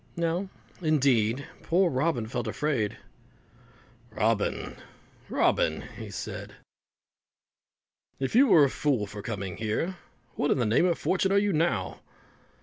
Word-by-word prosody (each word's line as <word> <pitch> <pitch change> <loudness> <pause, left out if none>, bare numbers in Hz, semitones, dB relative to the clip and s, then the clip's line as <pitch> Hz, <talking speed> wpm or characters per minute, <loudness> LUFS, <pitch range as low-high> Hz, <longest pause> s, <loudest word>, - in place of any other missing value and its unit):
Now, 170 +3 -1 0.3
indeed, 135 -6 +2 0.2
poor 180 +1 +2
Robin 130 -3 0
felt 120 +2 -4
afraid. 135 -9 -1 1.1
"Robin, 110 -1 -1 0.5
Robin," - - +1 0.3
said - - -6 1.6
he, 135 - -1
"if - - -4
you 265 +5 +6
were 165 - +7
a 140 - +4
fool 135 -8 0
for 105 +1 -8
coming 100 -4 -5
here, 110 - -2 0.4
what 145 - -1
in - - +3
the 125 - +1
name 115 +12 +3
of 170 - +1
fortune 190 +1 +1
are 200 - +4
you 200 -1 +2
now?" 130 - 0
140 Hz, 130 wpm, -28 LUFS, 110-170 Hz, 1.6 s, were